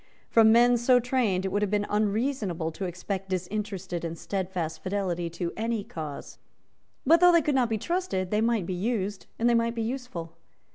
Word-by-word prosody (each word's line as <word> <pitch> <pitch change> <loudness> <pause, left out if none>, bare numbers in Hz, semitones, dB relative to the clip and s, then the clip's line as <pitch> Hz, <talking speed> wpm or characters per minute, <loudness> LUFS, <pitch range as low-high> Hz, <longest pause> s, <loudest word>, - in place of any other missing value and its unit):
From 220 -1 +6
men 240 +1 +5
so 245 +1 +4
trained 230 -7 0
it - - 0
would 205 +2 -1
have 210 - +1
been 205 0 0
unreasonable 210 - -1
to 190 +4 -5
expect 185 +2 -4
disinterested 190 -1 -3
and 165 0 -4
stedfast 180 -4 -3
fidelity 185 -3 -2
to 170 +1 -4
any 225 -1 -2
cause. 155 -6 -7 0.7
But 330 +5 +6
though 355 +1 +7
they 335 -2 +4
could 295 - +1
not 255 -3 +2
be 220 - 0
trusted, 340 - -2
they 210 0 +2
might 225 -4 +1
be 185 - -3
used 200 0 -2
and 235 - +1
they 240 - +4
might 230 0 +1
be 230 - -1
useful. 230 -9 -5
205 Hz, 190 wpm, -27 LUFS, 185-235 Hz, 0.7 s, though